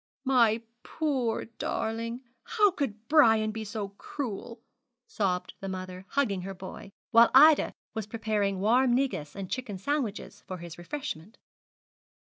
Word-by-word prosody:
'My 235 -4 +4 0.2
poor 265 -8 -1
darling! 230 +1 -3 0.2
how 420 -3 +3
could 230 - -4
Brian 225 -8 +5
be 220 0 -5
so 210 -1 -4
cruel?' 230 +2 -6 0.5
sobbed 185 -4 -1
the 195 - -5
mother, 185 0 -6
hugging 220 -10 0
her 195 +1 -6
boy, 190 +1 -9 0.2
while 230 0 +7
Ida 300 +2 +7 0.2
was 220 -3 -4
preparing 210 -3 -1
warm 240 +5 +4
negus 250 - -1
and 195 -2 -5
chicken 225 -3 -4
sandwiches 240 -1 -3
for 185 - -5
his 170 -1 -9
refreshment. 215 - -6
220 Hz, 130 wpm, -29 LUFS, 195-255 Hz, 0.5 s, while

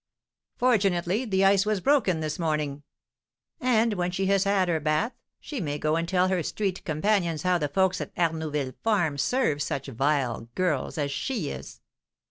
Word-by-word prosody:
"Fortunately, 200 -3 +2
the 195 -3 +2
ice 195 0 +5
was 210 -1 0
broken 210 - +2
this 155 +1 -3
morning!" 150 -3 -1 0.8
"And 230 -3 +2
when 180 -2 -1
she 190 +2 -1
has 195 0 +2
had 195 -2 +2
her 165 -2 +1
bath 155 - 0 0.3
she 285 -7 -5
may 145 -3 -2
go 155 +1 0
and 165 +1 -1
tell 185 -1 +3
her 185 -2 +1
street 190 +3 -2
companions 170 -1 0
how 180 -1 +2
the 150 - 0
folks 190 +5 +1
at - - -5
Arnouville 155 -5 -1
farm 175 -10 +1
serve 155 - +1
such 140 -1 -2
vile 130 -3 0
girls 170 -8 -1
as 145 -2 -1
she 165 - -2
is!" - - -9
175 Hz, 170 wpm, -26 LUFS, 150-200 Hz, 0.8 s, ice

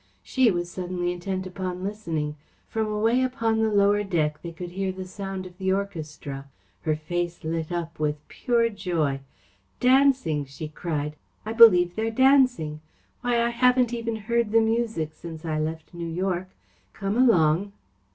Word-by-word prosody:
She 260 -3 +3
was 175 -3 -1
suddenly 180 -1 -2
intent 185 +1 -4
upon 185 0 -5
listening. 165 -8 -3 0.3
From 220 -1 -1
away 220 +4 +2
upon 230 -4 0
the 220 -1 +2
lower 205 0 +4
deck 155 -6 0
they 170 - -6
could 175 +1 -7
hear 190 +1 -2
the 185 0 -7
sound 195 0 -6
of 180 -1 -11
the 190 0 +1
orchestra. 150 -8 -4 0.3
Her 155 - 0
face 175 +3 -3
lit 160 +1 -3
up 165 -2 -4
with 150 0 -2
pure 235 -1 +1
joy. 170 -9 -1 0.6
"Dancing!" 255 - +3
she 140 +3 -7
cried. 150 -2 -3 0.3
"I 220 - -3
believe 180 -7 +7
they're 220 +1 0
dancing. 250 - +3 0.4
Why, 240 -1 +2
I 235 - +2
haven't 250 0 +3
even 230 -1 -2
heard 230 +1 0
the 225 - +6
music 220 -8 0
since 165 0 -9
I 155 -1 -1
left 160 +2 -4
New 170 -1 -5
York! 185 +1 -2 0.4
Come 195 +1 -2
along!" 200 -6 +4
185 Hz, 160 wpm, -25 LUFS, 160-225 Hz, 0.6 s, believe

